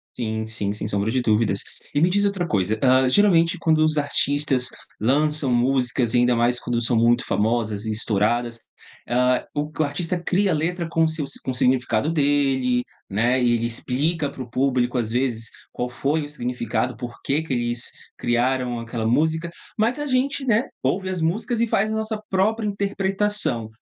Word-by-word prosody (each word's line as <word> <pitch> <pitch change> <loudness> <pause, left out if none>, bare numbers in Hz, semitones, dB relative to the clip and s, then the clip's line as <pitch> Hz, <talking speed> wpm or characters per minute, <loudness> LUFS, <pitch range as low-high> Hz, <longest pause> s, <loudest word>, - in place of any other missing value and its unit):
Sim, 110 -2 -3
sim, 105 -2 -3
sem 105 - -5
sombra 100 +1 -1
de 130 +1 +1
dúvidas. 110 -1 +2 0.3
E 145 - +2
me 170 - +4
diz 200 +3 +2
outra 195 -4 0
coisa, 105 +2 0
hã, 130 0 +5
geralmente 175 0 +4
quando 160 -2 +2
os 155 -1 +2
artistas 145 -2 +1 0.3
lançam 145 +3 +2
músicas 125 -1 +1
e - - +4
ainda 125 0 +3
mais 120 +1 +2
quando 120 -1 -1
são 120 +1 0
muito 120 +2 +3
famosas 110 -1 0
e - - -1
estouradas, 115 +2 0 0.5
hã, 125 +1 +2
o 150 +1 -2
artista 170 +4 -2
cria 190 +2 +2
letra 170 +2 -1
com 165 0 +2
seus 155 -3 -3
com 130 - -2
significado 125 +2 +1
dele, 135 -4 +2 0.3
né, 120 +6 +2
ele 120 -1 +2
explica 140 +6 -1
para 135 - -7
o 125 - -13
público, 125 -1 +1
às 110 -2 -1
vezes, 120 -3 -1 0.2
qual 125 - -3
foi 140 +6 -1
o 145 - -7
significado, 125 -3 -2
por 120 +1 -7
que 145 +3 +1
que 160 - -8
eles 120 -1 0 0.3
criaram 125 0 0
aquela 115 -1 -3
música, 160 +7 +1 0.3
mas 230 +5 +1
a 295 - -3
gente, 275 +1 0
né, 230 +1 +2 0.2
ouve 185 +8 0
as 180 -3 -3
músicas 220 +8 -1
e 235 - +3
faz 215 -1 +1
a - - -1
nossa 220 -1 -3
própria 210 +3 +1
interpretação. 200 - 0
130 Hz, 175 wpm, -23 LUFS, 120-165 Hz, 0.5 s, hã